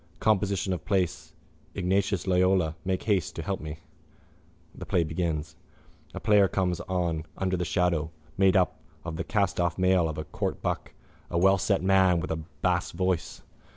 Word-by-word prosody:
Composition 100 -3 +1
of 90 - -5
place. 95 -4 -1 0.4
Ignatius 95 0 0
Loyola, 90 -3 +2
make 95 0 -1
haste 100 -7 0
to - - -4
help - - -2
me! 80 +1 -7 0.9
—The - - -9
play 85 - +2
begins. 80 -1 -2 0.6
A - - -3
player 105 -2 +4
comes 90 -1 -1
on 85 -3 -1
under 95 -1 0
the 90 - -1
shadow, 85 -4 +1 0.3
made 95 0 +4
up 90 -3 +1 0.3
in 85 -2 -4
the - - -2
castoff 90 -5 0
mail 90 -3 +3
of 75 - -5
a 80 - -3
court - - -3
buck, - - -3 0.3
a 85 - -1
wellset 95 +1 +3
man 95 -2 +4
with - - -4
a 80 - -1 0.3
bass 90 -1 +1
voice. 90 -1 -2
90 Hz, 160 wpm, -27 LUFS, 85-95 Hz, 0.9 s, player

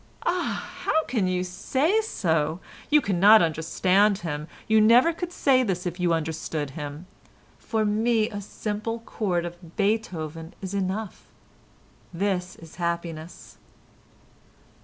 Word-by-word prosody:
"Ah! 355 +1 -1
how 315 0 +1
can 225 -9 0
you 180 0 0
say 265 - +1
so? 165 - 0 0.3
You 300 0 +5
cannot 200 0 +6
understand 185 +5 +2
him, 155 -4 -5 0.2
you 220 0 +5
never 240 +9 +6
could 350 +1 -5
say 270 -6 +3
this 190 -7 -2
if 175 +1 -4
you 175 -1 +2
understood 160 -2 -2
him. 145 +3 -7 0.5
For 220 -2 -1
me 220 +1 +2
a 205 -3 -6
simple 215 +3 -4
chord 185 -7 -2
of 175 -1 -10
Beethoven 175 -7 -2
is 190 0 -6
enough. 195 +1 -3 0.8
This 185 0 -2
is 165 0 -14
happiness." 170 -1 -5
190 Hz, 125 wpm, -25 LUFS, 170-220 Hz, 0.8 s, cannot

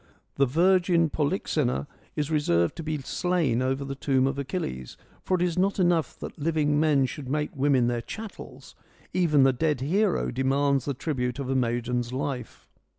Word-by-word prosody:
The 140 - +4
virgin 175 +2 +3
Polyxena 150 -4 0 0.3
is 150 0 -2
reserved 85 - +2
to - - -4
be 155 -1 -2
slain 150 -3 0
over 135 +2 -1
the 135 - -4
tomb 135 -1 +1
of 135 +1 -1
Achilles; 135 - -4 0.2
for 185 - 0
it 180 - +1
is 180 -1 0
not 195 +2 +1
enough 175 -4 +1
that - - -7
living 150 -1 +1
men 150 -4 +3
should 135 0 -6
make 150 +2 -2
women 135 -2 +3
their 120 0 0
chattels; 220 - -9 0.4
even 155 -6 +4
the 135 -1 +5
dead 150 +1 0
hero 185 +8 +1
demands 135 +1 +1
the 140 - -2
tribute 125 -4 -2
of 135 -2 -3
a - - +1
maiden's 120 -1 -1
life. 130 -2 -5
145 Hz, 170 wpm, -26 LUFS, 130-165 Hz, 0.4 s, the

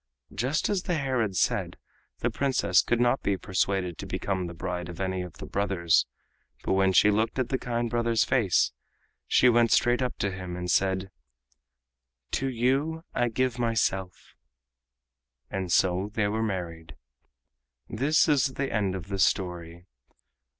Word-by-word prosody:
Just 130 +9 0
as 200 -3 0
the 180 -2 -2
hare 135 -4 0
had 100 -4 -2
said, - - 0 0.4
the - - 0
Princess 130 -10 +2
could 120 - 0
not 120 +2 +2
be 100 - 0
persuaded 95 -1 -1
to - - -6
become 95 -3 -2
the 85 - -8
bride 90 0 -4
of 85 - -9
any 95 -1 -2
of 90 -3 -7
the - - -9
brothers, 95 -4 +1 0.6
but - - 0
when 95 0 +3
she 105 +2 +5
looked 110 +4 0
at 130 -2 -1
the 130 - -1
kind 120 -1 -2
brother's 115 -1 +1
face 115 -9 +2 0.6
she 125 - +4
went 120 -1 +4
straight 120 +1 +3
up 125 -1 -2
to 100 - -1
him 90 -1 -6
and 90 0 -3
said: 95 0 +1 1.2
"To 135 - -1
you 135 +7 0
I 120 - +1
give 125 +1 -1
myself," 95 -5 -1 1.2
and 95 -2 -3
so 95 +3 +2
they 105 -2 +1
were 110 +2 -1
married. 85 -6 -4 0.9
This 150 +4 +2
is 140 -3 +2
the 140 -1 -2
end 100 -4 0
of 95 0 -7
the 95 -1 -3
story. 85 -3 -1
100 Hz, 160 wpm, -27 LUFS, 95-125 Hz, 1.2 s, she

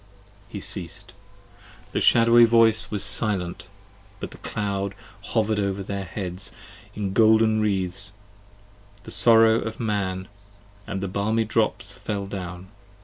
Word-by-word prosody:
He 105 - -6
ceas'd; 90 -2 -2 0.8
the - - -1
shadowy 115 0 +6
voice 115 -1 +4
was 105 -2 -3
silent: 95 -5 -1 0.5
but - - -6
the - - -14
cloud 100 -1 -3 0.3
hover'd 110 -2 0
over 100 -1 -2
their 100 0 -5
heads 90 +1 -6 0.4
In 100 -2 -3
golden 110 0 +4
wreathes, 100 -1 -2 0.9
the - - -10
sorrow 115 -1 +5
of 110 -1 -6
Man; 100 -4 -2 0.3
& 100 0 -28
the 100 0 -3
balmy 110 +4 0
drops 110 0 -1
fell 100 -1 -4
down. 95 -1 -7
100 Hz, 125 wpm, -24 LUFS, 95-110 Hz, 0.9 s, shadowy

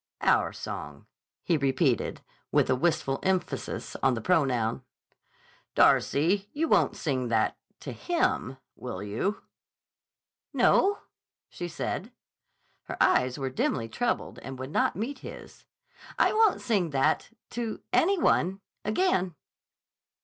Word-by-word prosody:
"Our - - +3
song," 70 -1 -7 0.4
he 170 - +2
repeated 135 -1 +1 0.3
with - - +3
a - - +4
wistful 155 -2 0
emphasis 190 -1 -2
on 130 -2 +3
the - - -3
pronoun. 130 -8 +1 0.9
"Darcy, 190 +8 +3
you 320 +3 0
won't - - +3
sing 130 -5 -1
that—to 110 -2 -2
him—will 130 - -2
you?" 115 - -2 1.1
"No," 405 +1 +4 0.5
she 175 - -5
said. 175 - -4 0.7
Her - - -6
eyes 125 0 +3
were 135 -2 -3
dimly 120 -2 0
troubled 240 - -2
and 135 0 -8
would 130 +2 -6
not - - +1
meet 250 +8 -4
his. - - -11 0.5
"I - - +4
won't 435 -2 +4
sing 200 -8 +1
that—to 215 - -2
any 390 +4 +4
one—again." 195 - 0
160 Hz, 110 wpm, -28 LUFS, 130-215 Hz, 1.1 s, a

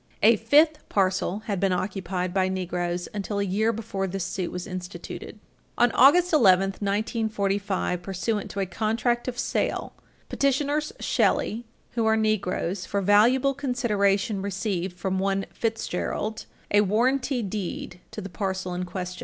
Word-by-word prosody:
A 225 +2 +7
fifth 300 +8 +4
parcel 190 +1 +1
had 200 -4 -2
been 195 0 +2
occupied 185 -1 -2
by 190 -1 +2
Negroes 175 -1 -2
until 205 0 -3
a 200 - +1
year 205 +4 +1
before 205 -3 -3
this 190 0 -3
suit 180 0 -3
was 180 0 -5
instituted. 185 0 -7 0.4
On 240 -1 +4
August 345 +7 +5
11, 195 -8 +5
1945, 200 -3 -1
pursuant 195 +3 -2
to 200 - -5
a - - +1
contract 225 +6 -1
of 250 -1 -3
sale, - - -1 0.3
petitioners 290 +2 0
Shelley, 230 +3 +1 0.3
who 230 -2 0
are 220 0 +4
Negroes, 200 -4 0
for 200 - -2
valuable 230 +8 +4
consideration 215 -7 0
received 190 -2 -2
from 190 0 -1
one 195 0 0
Fitzgerald 220 -1 -2 0.2
a 205 - +6
warranty 245 +5 +1
deed 190 -2 -5
to 215 - -7
the 195 - -6
parcel 190 0 -3
in 180 +1 -3
question. 180 0 -5
200 Hz, 145 wpm, -26 LUFS, 185-225 Hz, 0.4 s, A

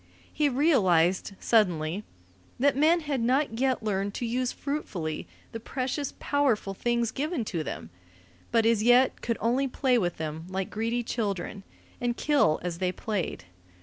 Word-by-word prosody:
He 295 -1 +2
realized, 195 - +3
suddenly, 180 -4 +2 0.6
that 280 +1 +3
men 320 +5 +4
had 285 -5 -2
not 250 -1 +1
yet 260 -3 +1
learned 200 -1 -1
to 240 - -2
use 250 +2 0
fruitfully 180 - -4 0.2
the 230 - -5
precious, 260 +4 -3
powerful 260 -9 +1
things 235 +2 0
given 295 -3 -2
to 170 -6 -2
them, 85 - -6 0.6
but 230 -1 +3
as 225 -2 +3
yet 245 +3 +4
could 230 -1 -1
only 255 +4 +1
play 255 -1 +2
with 175 -4 -1
them 160 +1 -5
like 190 0 -3
greedy 230 +3 -1
children 205 -4 -3 0.4
and 240 -1 -1
kill 280 - +3
as 175 -1 -3
they 185 -1 +1
played. 195 - -3
230 Hz, 150 wpm, -28 LUFS, 190-265 Hz, 0.6 s, men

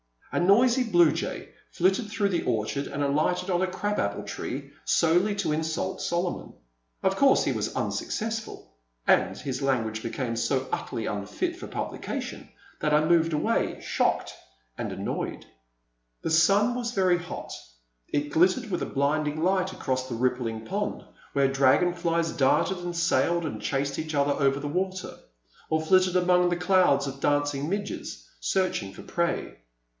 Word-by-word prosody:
A - - 0
noisy 240 +8 +4
blue 175 -7 +5
jay - - -4 0.2
flitted 190 +5 +1
through 205 -1 0
the 175 -3 0
orchard 115 +4 -1
and 145 - -3
alighted 155 +6 +1
on 175 0 +1
a 190 - +2
crab 205 +3 -2
apple 100 0 -1
tree - - -5
solely 175 +6 +3
to 200 - -1
insult 160 +2 -2
Solomon. 175 +1 -2 0.5
He - - +2
of 190 0 +1
course 275 -1 +5
was - - -1
unsuccessful, 225 0 -3 0.3
and - - +3
his 135 0 -4
language 115 -5 0
became 115 0 -3
so 130 +3 0
utterly 110 - -3
unfit 105 0 -3
for - - -8
publica - - -4
tion - - -8 0.3
that 150 - 0
I 150 +1 +4
moved 165 0 +3
away, 150 - 0
shocked - - 0 0.4
and - - -3
annoyed. - - -3
^ - - -14 0.8
The 165 - -2
sun 195 +8 +4
was 240 -1 -3
very 185 -3 +3
hot. 175 - -7 0.6
It 145 0 -2
glittered 185 +6 +3
with 180 - -1
a - - -2
blinding 150 +2 0
light 190 +1 +2
across 130 -4 -2
the 125 - -4
rippling 115 -2 -1
pond, 205 +2 -3 0.3
where 140 -1 +3
dragon 135 +6 +3
flies 170 -1 0
darted 145 +7 +2
and 175 -1 -5
sailed 170 0 +2
and 110 -9 -4
chased 135 +5 -1
each 155 -1 -4
other 140 0 +2
over 140 -1 +2
the 145 - -3
water, 185 +4 -3 0.5
or 160 0 +1
flitted 185 +2 +3
among 180 0 +4
the 175 - +1
clouds 180 -6 +3
of 135 0 -6
dancing 145 0 0
midges, 200 +1 -4
searching 185 - -1
for - - -11
prey. 170 0 -2
165 Hz, 160 wpm, -27 LUFS, 140-185 Hz, 0.8 s, blue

